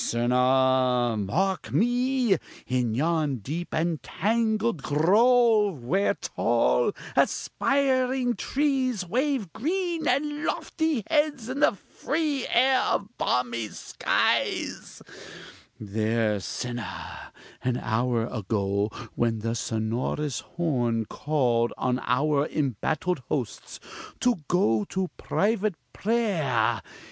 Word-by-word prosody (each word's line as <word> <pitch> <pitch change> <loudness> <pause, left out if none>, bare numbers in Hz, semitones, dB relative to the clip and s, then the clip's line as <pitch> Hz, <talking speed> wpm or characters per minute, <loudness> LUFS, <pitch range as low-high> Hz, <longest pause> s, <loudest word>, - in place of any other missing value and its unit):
Sinner, 125 0 +2
mark 175 - -1
me! 245 -1 +2 0.3
in 125 -3 0
yon 155 0 +1
deep 150 - -5
and 160 0 -1
tangled 220 -4 0
grove, 210 - +3
where 190 +11 +1
tall, 480 -4 +1 0.2
aspiring 260 -2 +1
trees 265 -8 0
wave 250 - -1
green 335 +2 -1
and 295 +1 0
lofty 320 -8 -1
heads 295 -6 +1
in 265 +2 -3
the 300 - +4
free 285 - -2
air 260 +2 +4
of 200 - -1
balmy 120 -3 0
skies - - -1 0.8
there 110 0 0
sinner, 120 +4 -6 0.3
an 125 -1 0
hour 120 0 0
ago, 100 -2 -1 0.2
when 115 -2 0
the 115 +1 -1
sonorous 115 +5 -2 0.2
horn 120 -9 0
called 120 -4 0
on 125 0 0
our 145 +3 +2
embattled 155 - -1
hosts 125 -7 -4 0.4
to 245 -3 +2
go 115 - +2
to 190 -1 -2
private 210 -2 0 0.2
prayer! 165 - +1
160 Hz, 95 wpm, -26 LUFS, -, 0.8 s, the